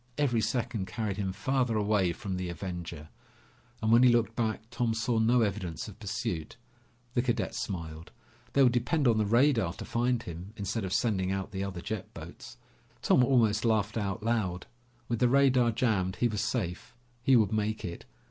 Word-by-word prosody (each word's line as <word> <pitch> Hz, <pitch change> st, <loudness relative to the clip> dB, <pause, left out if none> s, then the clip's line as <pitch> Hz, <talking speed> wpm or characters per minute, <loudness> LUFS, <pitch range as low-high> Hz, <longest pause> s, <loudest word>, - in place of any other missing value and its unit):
Every 125 Hz, -6 st, +2 dB
second 110 Hz, -5 st, -2 dB
carried 105 Hz, -4 st, -3 dB
him 95 Hz, -2 st, -1 dB
farther 125 Hz, +1 st, 0 dB
away 100 Hz, -4 st, +2 dB
from 95 Hz, +1 st, -5 dB
the 90 Hz, -1 st, -3 dB
Avenger, 85 Hz, -3 st, -6 dB, 0.7 s
and 110 Hz, -, +2 dB
when 115 Hz, +1 st, +7 dB
he 125 Hz, -, +7 dB
looked 115 Hz, -1 st, +1 dB
back, 110 Hz, -3 st, -1 dB
Tom 115 Hz, -2 st, 0 dB
saw 115 Hz, 0 st, 0 dB
no 120 Hz, +2 st, +4 dB
evidence 95 Hz, -6 st, -3 dB
of 105 Hz, -, -11 dB
pursuit. 105 Hz, -5 st, -4 dB, 0.6 s
The 120 Hz, -, +2 dB
cadet 120 Hz, -3 st, -1 dB
smiled. 80 Hz, -4 st, -5 dB, 0.4 s
They 140 Hz, -, +5 dB
would 125 Hz, -, +5 dB
depend 125 Hz, +4 st, +1 dB
on 115 Hz, -2 st, +3 dB
the 105 Hz, -, +1 dB
radar 115 Hz, -, +3 dB
to -, -, -8 dB
find 120 Hz, 0 st, 0 dB
him, 90 Hz, +4 st, -8 dB
instead 105 Hz, +1 st, -2 dB
of 95 Hz, -, -5 dB
sending 95 Hz, -6 st, +1 dB
out 95 Hz, -1 st, -3 dB
the 95 Hz, -1 st, -3 dB
other 95 Hz, -3 st, -5 dB
jet 110 Hz, 0 st, -5 dB
boats. -, -, -10 dB, 0.5 s
Tom 125 Hz, -, +5 dB
almost 115 Hz, -5 st, +3 dB
laughed 110 Hz, -2 st, +1 dB
out 105 Hz, 0 st, -2 dB
loud. 105 Hz, -6 st, -1 dB, 0.4 s
With 120 Hz, -2 st, -1 dB
the 125 Hz, -, +4 dB
radar 130 Hz, -2 st, +4 dB
jammed, 105 Hz, -5 st, 0 dB
he 120 Hz, -, +2 dB
was 105 Hz, -3 st, -2 dB
safe. 105 Hz, 0 st, -3 dB, 0.3 s
He 135 Hz, +1 st, +4 dB
would 110 Hz, -3 st, +3 dB
make 110 Hz, 0 st, -1 dB
it. 85 Hz, -1 st, -7 dB
110 Hz, 185 wpm, -29 LUFS, 95-120 Hz, 0.7 s, when